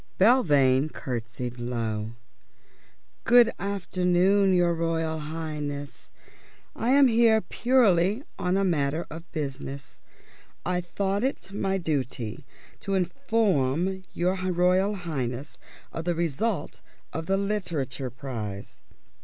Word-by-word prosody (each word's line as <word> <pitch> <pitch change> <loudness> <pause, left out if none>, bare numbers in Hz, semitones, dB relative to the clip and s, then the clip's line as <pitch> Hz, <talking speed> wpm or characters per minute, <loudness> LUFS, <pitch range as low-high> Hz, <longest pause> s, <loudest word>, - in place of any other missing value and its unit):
Belvane 150 - +4
curtsied 120 -2 -5
low. 115 -2 -3 1.1
"Good 240 -1 +6
afternoon, 190 0 +2
your 175 -2 +3
Royal 165 -1 -1
Highness. 150 -2 -5 0.7
I 230 - -1
am 275 +1 +6
here 230 -2 +5
purely 220 -4 +2 0.2
on 180 +1 +1
a 195 - +2
matter 155 -2 0
of 165 +2 -9
business. 140 -2 -6 0.7
I 180 +1 0
thought 195 +4 -1
it 265 -7 -2
my 195 -1 0
duty 135 - -3 0.3
to 195 -1 -2
inform 190 - +1
your 180 +2 0 0.2
Royal 180 +3 +2
Highness 140 -7 -4 0.3
of 165 - -5
the 175 -1 +1
result 170 +3 -2 0.3
of 160 0 -4
the 195 - +2
Literature 170 -11 -2
prize." 115 -6 -6
170 Hz, 105 wpm, -27 LUFS, 140-195 Hz, 1.1 s, Good